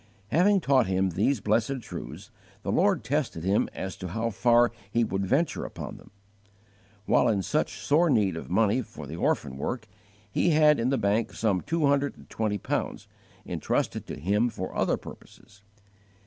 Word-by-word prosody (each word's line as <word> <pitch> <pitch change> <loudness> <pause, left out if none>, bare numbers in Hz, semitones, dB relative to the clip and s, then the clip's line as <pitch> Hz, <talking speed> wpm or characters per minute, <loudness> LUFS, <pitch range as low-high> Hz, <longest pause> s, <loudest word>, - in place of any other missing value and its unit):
Having 195 +4 +4
taught 135 - +3
him 95 0 +1
these 105 +7 +1
blessed 110 +6 +1
truths, - - -8 0.3
the - - -2
Lord - - +2
tested 125 - -1
him 95 +3 +2
as 95 0 -5
to 95 - -6
how 115 +6 -2
far 120 +3 +4 0.2
he 115 +3 +2
would 95 -2 -2
venture 145 - +1
upon - - -7
them. - - -16 1.0
While 125 - +3
in 105 -4 +1
such 115 - -1
sore 165 +4 +2
need 105 - +2
of 80 - -7
money 105 +6 +2
for 80 - -10
the 75 +4 -7
orphan 70 -5 -1
work, 110 - -4 0.4
he 175 - +2
had 150 -2 +5
in 115 +2 +1
the 135 - +1
bank 105 +1 0
some 100 -5 0
two 165 -1 0
hundred 140 0 +1
and - - -16
twenty 110 -2 -1
pounds, - - -3 0.4
intrusted - - -2
to - - -5
him 105 - +1
for 95 -5 -6
other - - +1
purposes. 100 -1 -14
110 Hz, 175 wpm, -27 LUFS, 95-135 Hz, 1.0 s, had